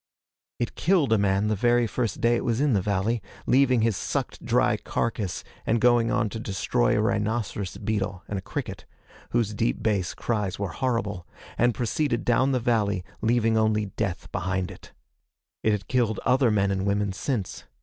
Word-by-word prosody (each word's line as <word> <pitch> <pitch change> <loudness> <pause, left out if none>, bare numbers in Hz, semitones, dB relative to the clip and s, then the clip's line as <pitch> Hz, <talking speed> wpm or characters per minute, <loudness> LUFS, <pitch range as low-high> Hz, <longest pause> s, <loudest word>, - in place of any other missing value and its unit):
It 120 - -2
killed 165 -10 +2
a 110 - +3
man 100 0 +2
the 105 0 +1
very 120 +3 +3
first 115 -2 -2
day 120 0 +4
it - - -1
was 115 -1 0
in 145 -2 +2
the 100 - +2
valley, 105 +4 0 0.2
leaving 130 -2 +4
his 115 -2 +2
sucked 85 - -3
dry - - +2
carcass, 105 -6 -2 0.2
and 115 - +1
going 120 -1 +4
on 120 -2 +1
to 110 - -6
destroy 95 - 0
a - - +2
rhinoceros 105 -3 -1
beetle 100 -3 -2
and 100 - -3
a - - -8
cricket - - -6 0.4
whose 115 -3 0
deep 115 +1 -1
bass 100 -5 0
cries 105 -5 -2
were 100 -2 -2
horrible 110 -8 -2 0.3
and 120 0 +2
proceeded 125 +1 -1
down 130 +3 +3
the 130 - +1
valley, 105 -6 +1 0.2
leaving 115 0 +2
only 105 -2 +1
death 95 -6 -2
behind 95 -1 -2
it. - - -13 0.7
It 110 - +2
had 105 -2 -2
killed 120 -4 +1
other 130 -1 +4
men 100 -2 +2
and 95 0 -1
women 100 -1 0
since. 100 +2 -3
110 Hz, 180 wpm, -26 LUFS, 100-120 Hz, 0.7 s, day